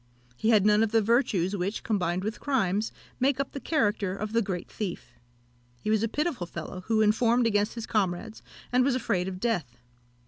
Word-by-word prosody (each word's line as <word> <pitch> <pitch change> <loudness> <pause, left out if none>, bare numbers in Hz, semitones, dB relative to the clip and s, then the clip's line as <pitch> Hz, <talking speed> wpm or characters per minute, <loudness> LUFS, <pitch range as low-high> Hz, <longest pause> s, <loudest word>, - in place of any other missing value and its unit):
He 220 - 0
had 210 -3 +5
none 210 0 +5
of 225 -1 +2
the 225 0 +4
virtues 205 -5 +2
which, 195 +3 -2
combined 185 -4 0
with 215 +2 -3
crimes, 215 -6 0 0.3
make 270 +1 +2
up 275 - -2
the 275 - -5
character 210 - 0
of 215 +2 -5
the 230 - +3
great 185 -4 -3
thief. 180 - -5 0.7
He 215 - -2
was 215 -1 +3
a 225 - +1
pitiful 285 - -2
fellow, 170 +2 -7
who 220 -1 +3
informed 230 +3 +3
against 210 0 +1
his 230 -2 -5
comrades, 210 +1 -1 0.3
and 250 +1 +4
was 265 -1 +2
afraid 215 -8 0
of 185 -1 -5
death. 175 - -1
215 Hz, 195 wpm, -28 LUFS, 190-235 Hz, 0.7 s, had